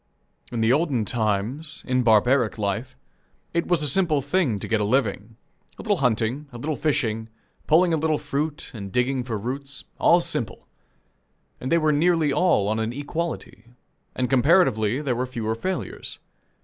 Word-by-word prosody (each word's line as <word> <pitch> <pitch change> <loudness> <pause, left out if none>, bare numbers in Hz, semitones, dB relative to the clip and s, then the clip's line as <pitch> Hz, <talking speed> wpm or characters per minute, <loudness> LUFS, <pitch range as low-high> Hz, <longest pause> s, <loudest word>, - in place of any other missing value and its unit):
In 120 -2 -2
the 110 +2 +4
olden 140 -7 +1
times, 115 +7 -1
in 130 -1 +1
barbaric 120 +1 +3
life, 105 - -3 0.6
it 170 0 0
was 170 -4 +2
a - - +2
simple' 155 -2 +2
thing 145 - +1
to - - -6
get 110 -2 +1
a - - +2
living. 110 -1 -1 0.4
A - - -8
little 205 -3 +1
hunting, 125 +1 0
a 120 - -9
little 150 +5 -2
fishing, 115 -8 -1 0.4
pulling 170 +2 +4
a - - +3
little 155 0 +1
fruit, 150 +2 -3
and 100 -4 -7
digging 125 +3 0
for 115 -3 -3
roots 135 +6 -6
all - - +5
simple; - - -3 0.9
and 130 - -4
they 170 - +5
were 155 -2 +2
nearly 160 -1 +2
all 170 - +3
on 110 +1 0
an 110 +1 -2
equality, 145 - -5 0.5
and 125 - 0
comparatively 130 - +3
there 130 -4 0
were 125 +2 -2
fewer 115 -3 -3
failures. 185 +12 -4
130 Hz, 165 wpm, -24 LUFS, 110-155 Hz, 0.9 s, all